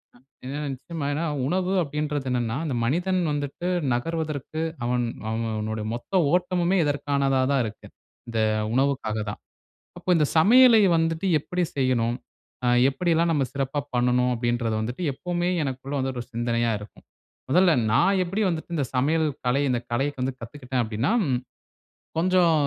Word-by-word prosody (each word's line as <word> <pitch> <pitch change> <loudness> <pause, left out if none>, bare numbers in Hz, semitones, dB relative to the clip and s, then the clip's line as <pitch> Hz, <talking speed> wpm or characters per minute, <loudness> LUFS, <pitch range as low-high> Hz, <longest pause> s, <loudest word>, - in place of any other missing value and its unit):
அ - - -18 0.3
ஏன்னா, 140 +3 -4
நிச்சயமா 145 +3 -6
ஏன்னா, 160 +3 -1 0.2
உணவு 185 +4 0
அப்டின்றது 150 -2 -2
என்னன்னா, 120 -2 -1
அந்த 145 - -2
மனிதன் 180 +9 +1
வந்துட்டு 145 +4 -3 0.3
நகர்வதற்கு 155 +2 -3 0.2
அவன் 120 0 +1 0.2
அவன் 115 +1 -2
அவனுடைய 110 0 -3
மொத்த 150 +11 -1
ஓட்டமுமே 180 +1 +2
இதற்கானதா 140 -2 +1
தான் 140 -2 +3
இருக்கு. 110 0 -8 0.4
இந்த 115 -1 -2 0.3
உணவுக்காக 130 -5 0
தான். 105 - -6 0.6
அப்ப - - -14
இந்த 155 -2 +3
சமையலை 230 +5 +7
வந்துட்டு 165 +2 0
எப்பிடி 180 +4 -2
செய்யணும்? 125 -3 +1 0.5
அ - - +2 0.2
எப்பிடியெல்லாம் 165 +3 +1
நம்ம 140 -4 +1
சிறப்பா 135 +1 -1 0.2
பண்ணணும்? 125 0 +2
அப்பிடின்றத 120 -1 -1
வந்துட்டு, 120 +10 -4
எப்பவுமே 175 +4 -2
எனக்குள்ளே 135 +1 -4
வந்து 130 0 -1
ஒரு 120 - -4
சிந்தனையா 120 0 0
இருக்கும். 105 0 -13 0.4
முதல்ல 180 +5 +5 0.2
நான் 190 - +3
எப்பிடி 195 +5 -1
வந்துட்டு 170 0 -4
இந்த 145 -4 0
சமையல் 155 +5 +2 0.2
கலை 125 +3 +2
இந்த 120 - +1
கலைக்கு 135 +2 -1
வந்து 130 0 -1
கத்துக்கிட்டேன் 125 +1 -3
அப்டின்னா, 110 - -1 0.2
ம் 125 -2 +1 0.8
கொஞ்சம் 175 -1 +4
140 Hz, 145 wpm, -25 LUFS, 125-165 Hz, 0.8 s, சமையலை